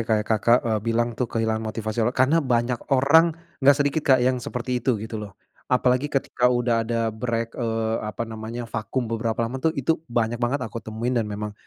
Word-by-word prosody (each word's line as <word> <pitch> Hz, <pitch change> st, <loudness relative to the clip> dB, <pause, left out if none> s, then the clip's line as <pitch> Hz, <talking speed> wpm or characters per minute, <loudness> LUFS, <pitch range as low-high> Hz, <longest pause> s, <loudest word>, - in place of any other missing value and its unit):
kayak 110 Hz, -1 st, +2 dB
Kakak 115 Hz, +2 st, +4 dB
e 115 Hz, -, -1 dB
bilang 115 Hz, +2 st, 0 dB
tuh, 120 Hz, 0 st, -2 dB
kehilangan 110 Hz, -1 st, -1 dB
motivasi, 110 Hz, +1 st, -3 dB
apa, 120 Hz, +3 st, +1 dB
karena 140 Hz, +6 st, +4 dB
banyak 120 Hz, -2 st, 0 dB
orang 155 Hz, +5 st, +4 dB, 0.2 s
enggak 140 Hz, 0 st, +6 dB
sedikit, 145 Hz, +2 st, +1 dB
Kak, 135 Hz, -3 st, +5 dB
yang 125 Hz, -1 st, +1 dB
seperti 125 Hz, +1 st, -3 dB
itu, 125 Hz, 0 st, +1 dB
gitu 110 Hz, +1 st, -5 dB
loh. 100 Hz, -2 st, -9 dB, 0.3 s
Apalagi 125 Hz, +2 st, +2 dB
ketika 130 Hz, -3 st, +1 dB
udah 120 Hz, -2 st, +1 dB
ada 115 Hz, -1 st, -1 dB
break, 115 Hz, 0 st, -2 dB
eee, 115 Hz, -2 st, -1 dB
apa 105 Hz, +2 st, -4 dB
namanya 115 Hz, +1 st, -6 dB
vakum 115 Hz, +2 st, -3 dB
beberapa 115 Hz, 0 st, -1 dB
lama 125 Hz, +3 st, -4 dB
tuh, 160 Hz, +4 st, +2 dB
itu 155 Hz, +5 st, 0 dB
banyak 120 Hz, 0 st, -1 dB
banget 125 Hz, +2 st, 0 dB
aku 115 Hz, 0 st, -6 dB
temuin 115 Hz, +3 st, -3 dB
dan 115 Hz, -3 st, 0 dB
memang 105 Hz, 0 st, -4 dB
120 Hz, 195 wpm, -24 LUFS, 110-125 Hz, 0.3 s, enggak